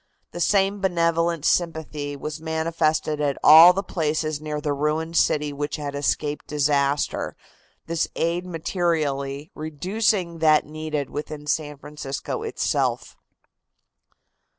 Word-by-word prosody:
The - - -7
same 195 +2 +2
benevolent 170 -3 +1
sympathy 155 -4 -1
was 150 +2 -6
manifested 160 -1 0
at 140 -2 0
all 160 +3 +10
the 195 +2 -2
places 155 -3 -2
near 150 -1 -3
the 150 -1 -1
ruined 155 +3 -1
city 150 -2 +2
which 145 +1 -3
had 145 -2 -5
escaped 145 +1 -2
disaster, 145 -1 0 0.5
this 165 0 -1
aid 170 +2 0
materially 155 -5 -2
reducing 175 +3 -1
that 155 -1 +4
needed 155 -2 -4
within 150 0 -6
San 150 -1 -2
Francisco 145 -1 -5
itself. - - -1
155 Hz, 115 wpm, -24 LUFS, 145-165 Hz, 0.5 s, all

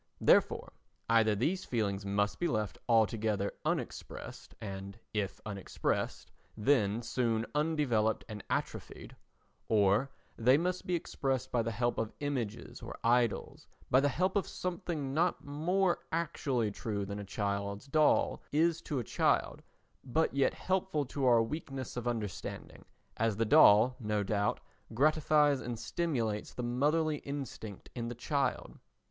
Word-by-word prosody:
Therefore - - +3 0.4
either 110 -2 +4
these 175 - 0
feelings 100 -4 -1
must 100 +1 0
be 175 - +1
left 110 - -2
altogether 110 -3 +2
unexpressed - - -4
and, 100 0 -7 0.2
if 105 -2 -2
unexpressed, 100 -3 -3 0.3
then 110 -2 +2
soon 115 -2 0
undeveloped 145 -8 +1
and 105 -3 -7
atrophied, - - -4 0.5
or 105 +4 +3 0.3
they 125 +4 +5
must 180 +3 -2
be 180 - +1
expressed 135 -5 -2
by 120 - +2
the 115 - -1
help 120 +2 0
of 110 -1 -2
images 115 - -4
or - - -7
idols—by 120 +2 +1
the 145 +1 +3
help 180 +9 0
of 200 - +1
something 170 -6 -3
not 165 0 +1
more 175 +6 +1
actually 140 -9 0
true 100 -1 -3
than 100 +1 -5
a - - -5
child's 100 +1 -3
doll 150 +2 +3
is 165 +2 +2
to 150 - -3
a 125 - -1
child, - - +1 0.4
but 145 +5 +1
yet 140 -1 +2
helpful 185 -5 0
to 135 +1 -2
our 120 -2 +6
weakness 135 0 -5
of 125 -1 -3
understanding, 110 -6 -4 0.3
as 110 -2 +1
the 115 - +2
doll 110 +3 +7
no 105 -3 0
doubt 100 0 0 0.3
gratifies 150 0 +3
and 120 -2 -4
stimulates 115 -9 -2
the 125 - -3
motherly 150 +6 +1
instinct 135 -8 -7
in 120 -2 -4
the 120 - -5
child. 140 +3 -2
120 Hz, 140 wpm, -32 LUFS, 105-150 Hz, 0.5 s, doll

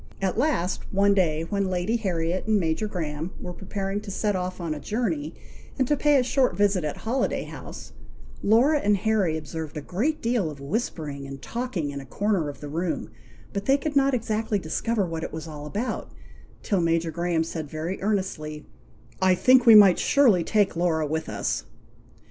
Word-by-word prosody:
At 190 -1 0
last, 235 - 0
one 200 +1 +4
day, 165 -5 +1
when 200 -2 0
Lady 185 +5 0
Harriet 180 -3 -2
and 215 -1 +3
Major 165 +4 0
Graham 160 -2 -4
were 180 - -6
preparing 195 +2 -4
to 210 - -9
set 205 +1 0
off 185 0 -3
on 165 -3 -2
a 150 - -6
journey, 170 -8 -2 0.4
and 260 - +1
to 295 - +3
pay 295 0 +4
a 255 - +3
short 250 -7 +1
visit 200 -3 +2
at 150 - -3
Holiday 245 +4 -1
House, - - -9 0.5
Laura 255 +9 +4
and 205 -5 +2
Harry 195 -6 +1
observed 155 0 -6
a - - -3
great 235 - -1
deal 230 -7 0
of 145 -2 -9
whispering 145 - -3
and 135 0 -8
talking 225 - -3
in 140 0 -6
a - - -11
corner 200 - 0
of 140 - -9
the 145 - -6
room, 165 +4 -3 0.4
but 200 0 -3
they 270 +1 +4
could 295 +1 -4
not 275 -1 +4
exactly 220 -2 -1
discover 200 +5 -1
what 165 -2 -4
it - - -4
was 160 +1 -6
all 150 -1 -7
about, 215 +10 -3 0.5
till 195 -4 +1
Major 165 0 +1
Graham 170 -1 0
said 160 -2 -5
very 160 +5 -4
earnestly, 185 -7 -2 0.6
"I 185 -1 +5
think 250 +6 +5
we 225 - +10
might 200 -4 +8
surely 235 -12 +4
take 205 +1 +2
Laura 165 -2 +1
with 160 +2 -3
us." 105 -2 -2
185 Hz, 190 wpm, -25 LUFS, 160-220 Hz, 0.6 s, we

